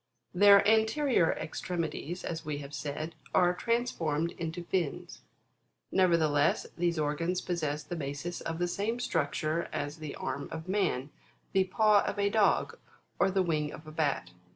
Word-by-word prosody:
'22. 175 - -6
Their 200 0 +8
anterior 220 - +3
extremities, 170 0 -4
as 165 -1 -4
we 150 -1 -3
have 145 0 -8
said, 155 +3 -4 0.2
are 180 -1 +5
trans 235 +6 0
formed 160 +1 -1
into 165 +1 -5
fins: 170 -3 -3 0.7
nevertheless, 160 -6 +3
these 170 -1 0
organs 155 +4 0
possess 155 -4 -2
the 175 - -5
basis 145 +3 -4
of 165 - -4
the 175 +1 0
same 215 +6 -2
structure 160 - -1
as 145 +2 -3
the 155 -2 -6
arm 140 - -4
of 160 +1 -6
man, 185 -9 0 0.4
the 190 -1 +3
paw 210 +1 +4
of - - -3
a 200 0 +1
dog, 210 -2 +2 0.4
or - - +4
the 190 0 +2
wing 155 -3 0
of 155 - -10
a 155 - -9
bat. 145 - -1
170 Hz, 160 wpm, -30 LUFS, 155-190 Hz, 0.7 s, Their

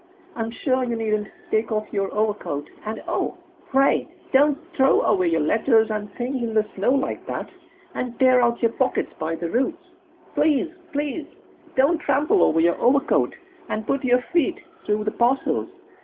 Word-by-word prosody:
I'm 225 -1 -2
sure 255 +2 0
you 240 -2 -1
needn't 215 -2 -1 0.2
take 220 +1 +1
off 215 -1 -2
your 195 -2 -1
overcoat, 210 -9 -2 0.2
and 220 +1 -4
oh, - - -2 0.3
pray 270 0 +3 0.3
don't 285 +1 +5 0.2
throw 270 -2 +4
away 185 -4 +2
your 165 -1 +2
letters 220 - +3
and 210 -1 -4
things 255 +1 -3
in 225 -2 -3
the 215 -1 +3
snow 200 +6 +1
like 270 -1 -1
that, - - -4 0.5
and 245 -1 -4
tear 255 -1 +5
out 235 0 +1
your 230 - +4
pockets 260 +2 0
by 160 +1 -2
the 165 0 -4
roots! 320 +8 -1 0.5
Please, 315 +1 +2 0.2
please 295 +1 -3 0.5
don't 285 +6 +3
trample 300 +8 +2
over 160 - +4
your 170 +1 +2
overcoat 275 +3 +2 0.3
and 215 0 -3
put 275 +4 -1
your 250 -1 +3
feet 340 -6 +2 0.3
through 210 0 +1
the 215 - -1
parcels. 245 +5 +1
240 Hz, 170 wpm, -23 LUFS, 215-270 Hz, 0.5 s, don't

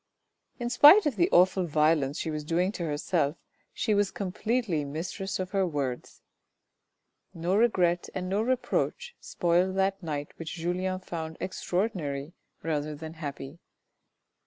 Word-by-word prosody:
In 240 0 -2
spite 330 +12 +8
of 290 -6 0
the 175 -4 +2
awful 180 0 +4
violence 150 -2 +2
she 160 - -3
was 150 -1 -4
doing 175 +5 +1
to 180 - -5
herself 150 0 0 0.3
she 215 - 0
was 205 -1 +2
completely 205 -3 -1
mistress 170 +7 -4
of 185 -1 -4
her 195 -1 +2
words. 140 -6 -4 1.1
No 170 +3 0
regret 180 -6 +2
and 185 -1 -3
no 195 +3 0
reproach 255 - -1
spoiled 180 +2 +1
that 195 0 +1
night 150 -4 -4
which 165 -1 -6
Julien 185 +2 -2
found 160 -3 -6
extraordinary 175 -6 -2 0.3
rather 150 -1 -2
than 160 +2 -8
happy. 145 -1 -7
175 Hz, 135 wpm, -28 LUFS, 155-195 Hz, 1.1 s, spite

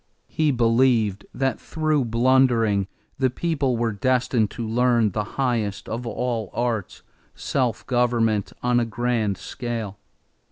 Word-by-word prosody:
He 155 -1 +1
believed 115 -4 +2
that 135 0 -1
through 155 -4 0
blundering 115 -4 +3 0.3
the 130 -1 +3
people 140 -3 -1
were 115 -1 0
destined 120 0 +1
to 115 +2 -5
learn 120 -1 +2
the 105 +2 -1
highest 110 -7 -1
of 120 +2 -4
all 115 -4 -2
arts, 115 -5 -2 0.3
self 125 -5 -1
government 115 -4 +1
on 125 0 +3
a 120 - +1
grand 115 -3 -1
scale. 115 -5 -5
120 Hz, 125 wpm, -23 LUFS, 110-125 Hz, 0.3 s, blundering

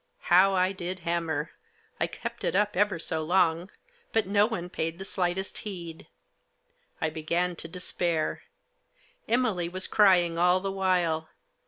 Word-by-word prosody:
How 190 +2 +6
I 185 0 +2
did 185 -1 -5
hanuser! 165 -3 -1 0.5
I - - +1
kept - - -7
it - - 0
up 210 +1 +2
ever 200 -1 +2
so 160 -1 -2
long; 175 +1 +2 0.4
but 225 - +2
no 205 +2 +3
one 180 -7 -4
paid 165 -2 -3
the 195 - -7
slightest 190 0 -2
heed. 170 -6 -7 0.9
I 160 - -1
began 170 +3 -1
to - - -5
despair. 170 -2 -2 0.9
Emily 220 -9 +1
was 185 +1 -3
crying 175 -5 +4
all 180 +1 +4
the 195 +1 -3
while. 180 -5 0
180 Hz, 145 wpm, -28 LUFS, 165-190 Hz, 0.9 s, How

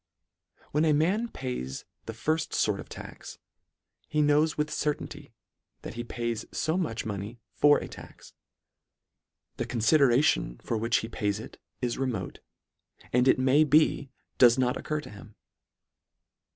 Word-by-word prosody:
When 150 +2 +2
a 155 -2 +4
man 185 +10 +2
pays 125 - -5 0.2
the 115 - -4
firfi: 155 +8 -1
fort - - +1
of - - -9
tax, - - -10 0.7
he 150 0 +2
knows 150 +2 +3
with 150 0 -1
certainty 150 -2 -3 0.5
that - - -6
he 120 - -5
pays 115 -1 -3
fo 160 +1 -1
much 155 -12 -2
money 105 +2 -5
for 145 0 +5
a - - -5
tax. - - -13 1.2
The - - -3
confideration 120 - +3
for 115 - -2
which 115 +1 +1
he - - -6
pays 105 -2 -2
it 110 - -10 0.2
is 120 0 -1
remote, 120 -9 -3 0.7
and 125 +1 +4
it - - +5
may 130 +4 +4
be 150 -2 +3 0.3
does 120 0 +7
not 125 -1 +1
occur 155 0 -3
to - - -11
him. 105 0 -13
130 Hz, 145 wpm, -28 LUFS, 115-150 Hz, 1.2 s, does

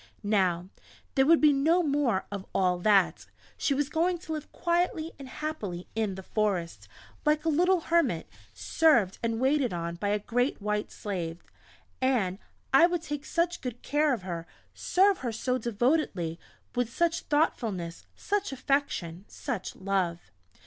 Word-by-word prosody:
Now, 185 -4 +1 0.5
there 270 -1 +3
would 330 0 +6
be 300 -1 +6
no 320 +6 +3
more 280 - +1
of 200 -2 -4
all 180 -2 +2
that. 195 -1 +3 0.3
She 280 - 0
was 290 0 0
going 340 +4 +1
to 325 -2 -6
live 305 -1 -6
quietly 340 -2 0
and 270 -2 -9
happily 220 - -5
in 215 -3 -1
the 190 - -8
forest, 175 - -1 0.4
like 300 +1 +2
a - - +3
little 355 +3 +3
Hermit, 335 +1 +1 0.2
served 240 - +2
and 230 -1 -1
waited 265 -3 +2
on 170 0 -3
by 205 - -2
a 205 - +2
great 245 +5 0
White 210 0 -2
Slave! 175 -5 -5 0.6
And 215 -8 +1 0.3
I 300 +6 +8
would 350 -2 -2
take 295 -2 -5
such 345 +1 0
good 245 -2 -6
care 295 +1 +2
of 235 -8 -1
her 170 -2 -5 0.3
serve 390 +2 +3
her 245 -3 -2
so 250 +3 -1
devotedly 225 - 0 0.3
with 245 -2 -1
such 340 +5 +1
thoughtfulness, 215 - -1
such 410 -3 -1
affection, 250 - -1
such 245 -10 -5
love!... 180 - -2
245 Hz, 155 wpm, -28 LUFS, 190-310 Hz, 0.6 s, I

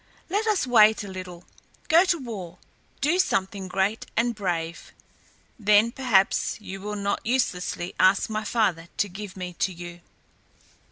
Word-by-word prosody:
Let 420 +3 0
us 420 -9 +2
wait 220 -4 +5
a - - -7
little. 185 -2 -8 0.4
Go 335 +4 +6
to 355 -2 +2
war. 200 - -7 0.4
Do 315 +6 +2
something 195 - 0
great 195 +4 -1
and 235 +1 +2
brave. 170 -5 -4 0.7
Then 210 +2 +4
perhaps 235 -9 +2
you 195 -2 -8
will 210 +1 -4
not 200 0 -2
uselessly 190 -7 -1
ask 190 +1 +4
my 215 0 -3
father 195 -8 0
to 205 - +1
give 195 0 -9
me 180 -1 -5
to 190 - +1
you." 175 0 -9
205 Hz, 150 wpm, -25 LUFS, 185-235 Hz, 0.7 s, Go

